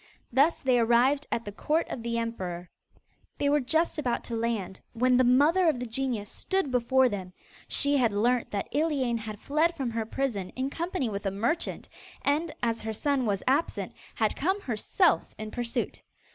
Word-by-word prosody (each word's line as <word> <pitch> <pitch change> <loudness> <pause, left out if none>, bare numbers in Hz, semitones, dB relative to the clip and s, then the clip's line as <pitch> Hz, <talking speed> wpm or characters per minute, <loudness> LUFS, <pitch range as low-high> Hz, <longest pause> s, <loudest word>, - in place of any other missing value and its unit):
Thus 280 +7 +3
they 255 -2 +3
arrived 245 +5 +3
at 230 - -1
the 205 - -5
court 305 +10 0
of 235 - -4
the 235 0 -2
emperor. 185 -7 -4 0.7
They 285 - +1
were 295 +1 +4
just 320 +5 +1
about 245 -5 -1
to 235 - -4
land, 225 -5 -2
when 250 +2 +3
the 255 - +5
mother 300 +8 +5
of 280 -6 0
the 250 - -3
genius 235 -3 -2
stood 380 -8 -1
before 255 +1 +3
them. 190 -5 -5 0.3
She 285 0 +2
had 240 -4 +3
learnt 235 +4 +1
that 200 -1 -3
Iliane 275 -6 +1
had 215 -2 -7
fled 315 +6 +1
from 260 -5 -2
her 225 -1 -2
prison 225 -9 -2
in 265 +2 -2
company 340 -5 -2
with 200 -2 -3
a - - +3
merchant, 230 - -1 0.4
and, 305 +3 +1
as 230 -1 0
her 220 0 -3
son 270 +1 0
was 200 -2 0
absent, 280 +6 0 0.2
had - - +1
come 385 +2 0
herself 275 - +1
in 215 0 -6
pursuit. 240 -1 -3
245 Hz, 185 wpm, -28 LUFS, 225-285 Hz, 0.7 s, the